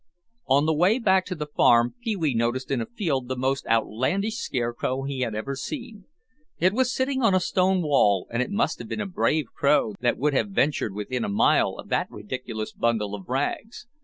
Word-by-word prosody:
On 140 +2 +4
the 160 - +2
way 180 +9 +3
back 190 -6 +2
to 185 - -4
the 150 -2 -4
farm, 120 -5 +3
Pee 225 -3 -1
wee 160 -7 0
noticed 120 +3 -1
in 130 -3 +1
a - - -4
field 155 - -2
the 130 - -2
most 130 +2 -1
outlandish 130 - 0
scarecrow 130 - -2
he 135 -1 -4
had 115 -4 -1
ever 135 +6 -3
seen. 235 - -7 0.5
It 185 +2 +2
was 255 +2 +1
sitting 265 0 -1
on 225 -6 +4
a - - +4
stone 185 0 +1
wall, 105 - +3
and 120 +1 0
it - - -2
must 205 +4 0
have - - -7
been - - -4
a 210 - -2
brave 155 -7 0
crow 140 -6 +2
that 120 0 +1
would 145 +2 +1
have 170 - +1
ventured 145 - 0
within 115 +4 -3
a - - -2
mile 100 - +3
of - - -10
that - - 0
ridiculous 110 0 -6
bundle 110 -3 0
of 100 0 -8
rags. 145 - -3
140 Hz, 210 wpm, -25 LUFS, 120-190 Hz, 0.5 s, On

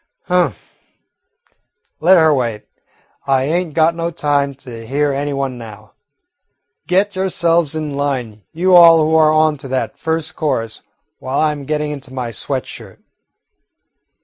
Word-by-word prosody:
"Humph. 180 0 -1 1.3
Let 180 +4 +5
her 160 -2 +5
wait. 120 -6 -2 0.6
I 135 -1 +2
ain't 165 +2 -2
got 160 +1 +3
no 170 0 -3
time 145 -4 -1
to 125 -4 -10
hear 145 +2 0
any 145 +1 -2
one 135 -3 -3
now. 110 -2 -12 0.9
Get 195 +2 +1
yourselves 170 -4 0
in 155 -2 -4
line, 130 -7 -3
you 180 +3 +2
all 165 -2 +8
who 160 - 0
are 155 -1 +5
on 155 -1 +2
to 135 - -8
that 130 0 -3
first 160 -1 -2
chorus, 125 -8 -2 0.4
while 130 +2 -3
I 155 -1 +2
'm 145 -2 -7
getting 150 +1 -2
into 135 -3 -8
my 125 -3 -4
sweat 110 - -3
shirt." - - -11
150 Hz, 150 wpm, -17 LUFS, 130-165 Hz, 1.3 s, all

